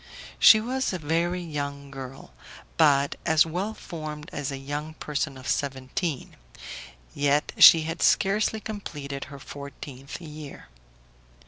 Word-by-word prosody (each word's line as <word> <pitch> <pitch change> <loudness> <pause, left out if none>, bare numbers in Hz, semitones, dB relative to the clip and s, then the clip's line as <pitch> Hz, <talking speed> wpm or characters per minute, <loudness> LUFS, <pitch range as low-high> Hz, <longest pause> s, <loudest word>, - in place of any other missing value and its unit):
She 220 - +9
was 255 +1 -2
a - - -1
very 170 +3 -1
young 140 -3 -5
girl, 135 -1 -9 0.4
but 140 - +3
as 160 -1 +4
well 185 +7 -3
formed 155 -2 -7
as 145 -1 -3
a 135 - -4
young 145 +3 -5
person 145 -2 -3
of 130 - -10
seventeen; 135 +2 -3 0.8
yet 145 +1 +1
she 165 -1 +10
had 165 +2 -4
scarcely 210 +2 +2
completed 145 -11 -6
her 140 - -10
fourteenth 140 -1 -9
year. 155 -3 -10
150 Hz, 125 wpm, -26 LUFS, 140-170 Hz, 0.8 s, she